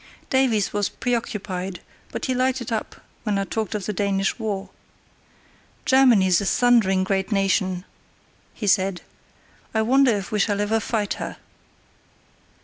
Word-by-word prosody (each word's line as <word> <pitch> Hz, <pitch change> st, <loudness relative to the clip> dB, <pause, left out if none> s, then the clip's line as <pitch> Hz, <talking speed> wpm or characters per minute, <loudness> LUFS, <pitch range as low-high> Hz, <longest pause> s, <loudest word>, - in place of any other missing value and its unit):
Davies 255 Hz, -6 st, +2 dB
was 205 Hz, -1 st, 0 dB
preoccupied, 200 Hz, -6 st, -3 dB, 0.3 s
but -, -, -4 dB
he 260 Hz, -, 0 dB
lighted 255 Hz, -1 st, 0 dB
up 220 Hz, -, -3 dB, 0.3 s
when 210 Hz, -3 st, -1 dB
I 195 Hz, -, +1 dB
talked 215 Hz, +1 st, -3 dB
of 205 Hz, -3 st, -3 dB
the 210 Hz, -, -2 dB
Danish 195 Hz, +2 st, 0 dB
war. 205 Hz, -3 st, -3 dB, 1.1 s
"Germany's 225 Hz, -10 st, +5 dB
a -, -, -3 dB
thundering 220 Hz, -7 st, +3 dB
great 190 Hz, +1 st, -1 dB
nation," 190 Hz, -2 st, +1 dB, 0.7 s
he 215 Hz, -, -5 dB
said; 190 Hz, -2 st, +2 dB, 0.7 s
"I 220 Hz, -, +3 dB
wonder 265 Hz, +3 st, +4 dB
if 195 Hz, -1 st, -6 dB
we 210 Hz, -, 0 dB
shall 205 Hz, 0 st, +1 dB
ever 210 Hz, +2 st, +1 dB
fight 215 Hz, -2 st, -1 dB
her." -, -, -5 dB
205 Hz, 140 wpm, -23 LUFS, 195-235 Hz, 1.1 s, Germany's